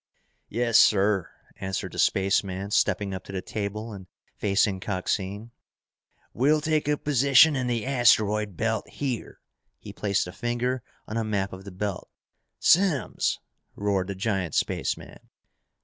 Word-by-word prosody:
"Yes, 115 +1 +3
sir," 100 -2 +3 0.3
answered 95 0 -4
the - - -7
spaceman, 95 0 +1
stepping 100 -1 +1
up 95 0 -6
to - - -9
the 95 -1 -4
table 105 +1 -4
and 95 -2 -10 0.3
facing 100 -1 +1
Coxine. 100 +3 -3 0.8
"We'll 145 +5 +3
take 155 -1 0
up - - +4
a - - -1
position 140 +2 +5
in 130 -2 -1
the 120 -2 -1
asteroid 105 -6 +3
belt, 110 +2 -1
here!" 130 -5 -4 0.4
He - - -10
placed 100 -1 0
a 90 - -7
finger 120 +4 -2 0.3
on 110 - -4
a 115 - 0
map 100 -3 -2
of 95 +1 -10
the 100 - -8
belt. 95 0 -4 0.5
"Simms!" 175 -7 +2 0.4
roared 100 -2 0
the 100 - -4
giant 95 -3 -2
spaceman. - - -2
105 Hz, 145 wpm, -26 LUFS, 95-120 Hz, 0.8 s, position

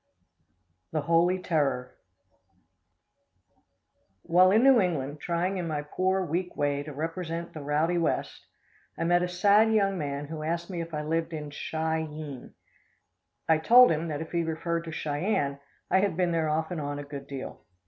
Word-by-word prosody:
The 155 - +1
Holy 170 +4 +3
Terror. 140 -8 -1 2.3
While 180 +2 +5
in 215 +5 +4
New 270 -2 +7
England 150 -5 -2
trying 175 +4 -1
in 175 - -3
my 150 -2 -2
poor, 185 +5 0
weak 175 +2 -3
way 145 -1 0
to 150 +1 -7
represent 165 +3 -4
the 155 - -7
"rowdy 155 +4 +1
west," 165 - -2 0.5
I - - -2
met 175 +1 +3
a 180 - 0
sad 205 +5 +4
young 195 -3 +2
man 140 -1 -3
who 155 +1 -6
asked 170 +3 -3
me 175 -2 -3
if 165 0 -7
I 150 - -3
lived 165 +2 -1
in 150 -2 -5
Chi 160 +2 -2
eene. 150 -4 -8 0.9
I 160 -1 +4
told 245 +8 +7
him 160 +1 -1
that 150 -1 -3
if 160 - -7
he 170 - +1
referred 165 +1 -2
to 165 - -6
Cheyenne, 145 -2 -1 0.3
I 190 - +5
had 190 -4 0
been 180 -2 +1
there 160 -2 0
off 160 +2 -1
and 170 -3 -3
on 145 0 -4
a 145 - -5
good 140 -1 -8
deal. 135 -2 -7
165 Hz, 175 wpm, -28 LUFS, 150-180 Hz, 2.3 s, New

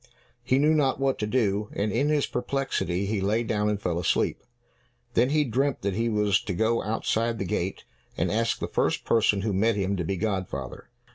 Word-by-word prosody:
He 130 - +1
knew 150 +3 +4
not 140 -4 +2
what 135 -1 0
to 105 - -1
do, 105 -3 0
and, 105 +1 -1
in 140 +7 +1
his 150 -2 +2
perplexity, 125 -8 -2
he 100 0 -1
lay 105 +4 +1
down 105 -2 0
and 105 -1 -1
fell 85 -4 -1
asleep. 85 - 0 0.7
Then 125 +3 +3
he 150 +1 +3
dreamt 135 +1 -1
that 100 -1 0
he 115 +4 0
was 105 -3 +2
to 95 - -2
go 110 +5 +1
outside 115 +2 -1
the 95 - -3
gate, 90 +1 -2 0.3
and - - 0
ask 115 +2 +1
the - - -3
first - - 0
person 105 -3 +3
who 105 0 -1
met 110 +4 +2
him 100 0 0
to 90 - -1
be 95 +4 -2
godfather. 95 - -4
110 Hz, 205 wpm, -26 LUFS, 100-120 Hz, 0.7 s, knew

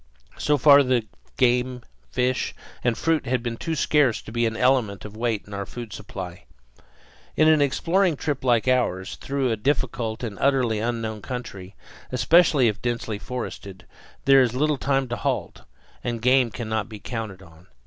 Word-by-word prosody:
So 150 0 +2
far 140 +1 +7
the 125 -4 +1 0.3
game, 125 0 +1 0.3
fish, 125 - 0 0.3
and 120 -3 +1
fruit 165 0 0
had 125 -1 0
been 120 -1 -3
too 160 +7 -3
scarce 145 -5 +2
to - - -10
be 120 0 +1
an 110 0 -4
element 120 -7 +1
of 105 0 -9
weight 115 -2 -1
in 105 - -11
our 100 -1 -4
food 120 -2 -8
supply. 95 -4 -8 0.9
In 155 - +4
an 155 -2 +5
exploring 170 +5 +2
trip 145 -2 -3
like 120 -2 +2
ours, 115 -8 +1
through 135 -3 -1
a - - +1
difficult 120 -2 -2
and 110 -4 -5
utterly 130 -6 +2
unknown 110 -2 -3
country, 100 -7 -7 0.4
especially 135 +2 +4
if 105 -2 -2
densely 115 -3 -2
forested, 100 -6 -7 0.4
there 135 0 +7
is 125 -1 +1
little 150 +1 +1
time 135 -1 +1
to 120 - -2
halt, - - -3 0.4
and 120 -1 -2
game 125 +1 +4
cannot 110 -1 -3
be 110 - -8
counted 105 -4 -6
on. 80 0 -18
120 Hz, 170 wpm, -24 LUFS, 110-135 Hz, 0.9 s, far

